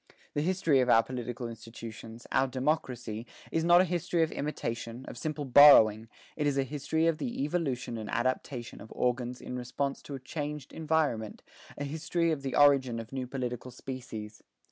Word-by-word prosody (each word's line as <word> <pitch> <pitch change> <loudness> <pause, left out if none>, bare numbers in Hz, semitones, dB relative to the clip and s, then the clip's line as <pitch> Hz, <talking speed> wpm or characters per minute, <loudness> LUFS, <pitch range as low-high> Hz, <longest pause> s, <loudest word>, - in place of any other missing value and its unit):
The 145 - 0
history 165 -4 +2
of 125 -1 +2
our 115 -1 +6
political 120 -1 -5
institutions, 115 0 -9
our 135 +1 +3
democracy, 125 -4 -2 0.2
is 165 - +1
not 175 +1 +7
a - - +3
history 175 -1 0
of 160 - -1
imitation, 120 -4 -4
of - - -7
simple 155 -2 -3
borrowing; 115 -6 +8 0.3
it 150 -1 0
is 140 -1 +1
a 135 - +3
history 150 +4 -1
of 165 -1 +2
the 235 - -2
evolution 140 -7 -2
and 110 - -6
adaptation 125 -1 -2
of 110 - -12
organs 125 0 -1
in 125 - -6
response 125 +3 -3
to 140 - -7
changed 145 +1 -6
environment, 150 -9 -1 0.3
a 145 - -3
history 160 +3 -1
of 150 -3 -2
the 135 -1 -3
origin 135 -5 +4
of 115 +3 -9
new 130 -1 -3
political 125 -1 -4
species. 115 -5 -8
130 Hz, 170 wpm, -30 LUFS, 120-150 Hz, 0.3 s, borrowing